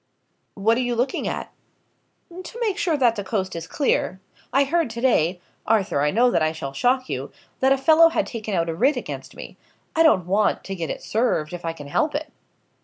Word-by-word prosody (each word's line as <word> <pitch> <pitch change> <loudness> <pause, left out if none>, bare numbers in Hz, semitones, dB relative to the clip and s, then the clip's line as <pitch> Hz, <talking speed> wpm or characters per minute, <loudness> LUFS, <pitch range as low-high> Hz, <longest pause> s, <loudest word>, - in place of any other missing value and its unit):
"What 225 +4 +2
are - - +1
you 245 -1 -1
looking 250 +3 -1
at?" - - -4 0.9
"To 465 - -9
make 420 -4 -1
sure 335 -6 +1
that 240 -4 +3
the 205 - -4
coast 190 -2 -2
is 165 0 -6
clear. 265 -9 0 0.3
I 275 - +4
heard 320 0 0
to 230 +1 -6
day 180 -8 +2 0.3
Arthur, 210 -9 +2
I 150 - +2
know 240 +8 +3
that - - +1
I 155 0 +1
shall 140 -4 -6
shock 255 - +1
you - - -4 0.3
that 265 +1 +3
a 270 - +5
fellow 320 +4 +6
had - - 0
taken 215 -4 -4
out 170 -1 +1
a 165 - -2
writ 255 - +2
against - - -7
me. - - -10 0.4
I 325 - +3
don't 255 - +4
want 200 +4 +1
to 195 - -5
get 165 -3 -4
it - - -5
served, 215 -9 0
if 175 - -7
I 165 - -2
can 150 -3 -10
help 295 - 0
it." 300 0 -4
230 Hz, 220 wpm, -23 LUFS, 180-275 Hz, 0.9 s, fellow